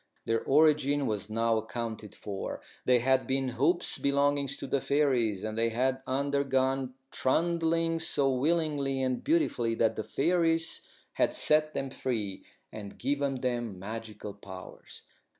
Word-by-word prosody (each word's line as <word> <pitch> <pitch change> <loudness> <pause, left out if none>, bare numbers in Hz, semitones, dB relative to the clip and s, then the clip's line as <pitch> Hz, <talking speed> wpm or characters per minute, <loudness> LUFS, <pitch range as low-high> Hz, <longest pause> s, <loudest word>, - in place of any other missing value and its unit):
Their 115 0 0
origin 145 -1 +4
was 105 -3 -2
now 115 +1 +1
accounted 110 -2 -5
for. 100 -2 -5 0.3
They 125 -2 +4
had 130 +1 +2
been 135 0 0
hoops 145 +9 +1
belonging 140 0 +2
to 140 +1 -4
the 135 0 0
fairies, 125 -9 +1
and 110 0 -3
they 115 +1 +2
had 130 +3 0
undergone 135 -1 0 0.2
trundling 165 +3 +1
so 145 -4 +1
willingly 145 -2 0
and 130 -1 -1
beautifully 280 - +1
that 115 0 +2
the 110 - -3
fairies 165 - +2 0.3
had - - +1
set 155 0 +3
them 135 -1 -2
free 110 -8 -3 0.3
and 100 -2 -8
given 140 -1 -1
them 120 -6 -2
magical 105 +1 -7
powers. 95 -2 -11
130 Hz, 135 wpm, -29 LUFS, 115-145 Hz, 0.3 s, origin